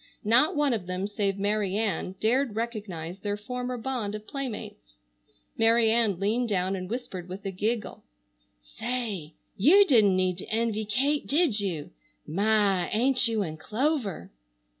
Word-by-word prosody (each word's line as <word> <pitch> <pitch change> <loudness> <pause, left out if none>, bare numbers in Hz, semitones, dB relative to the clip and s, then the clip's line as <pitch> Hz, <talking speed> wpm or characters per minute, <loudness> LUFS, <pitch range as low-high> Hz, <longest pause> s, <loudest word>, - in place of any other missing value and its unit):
Not 240 +10 +4
one 295 -3 +2
of 200 -6 -3
them 185 +1 -2
save 200 -1 -1
Mary 200 -1 0
Ann 195 -4 -1
dared 240 +1 +1
recognize 200 -7 -4
their 205 0 -3
former 250 +3 -4
bond 230 -4 -3
of 215 0 -8
playmates. 215 - -7 0.6
Mary 225 0 +5
Ann 220 -6 +2
leaned 225 +5 0
down 190 -1 0
and 185 -1 -6
whispered 195 -7 -5
with 190 +2 -8
a 195 - -2
giggle: 215 +4 -2 0.6
"Say, 195 - -4 0.2
you 355 - +6
didn't 215 - +5
need 185 -1 0
to - - -8
envy 220 -1 0
Kate, 275 +8 0
did 290 -7 +2
you? 175 -7 -3 0.3
My! 200 +1 +2
Ain't 250 +2 +3
you 220 -2 0
in 155 -3 -6
clover! 220 - -2
215 Hz, 150 wpm, -27 LUFS, 190-240 Hz, 0.6 s, you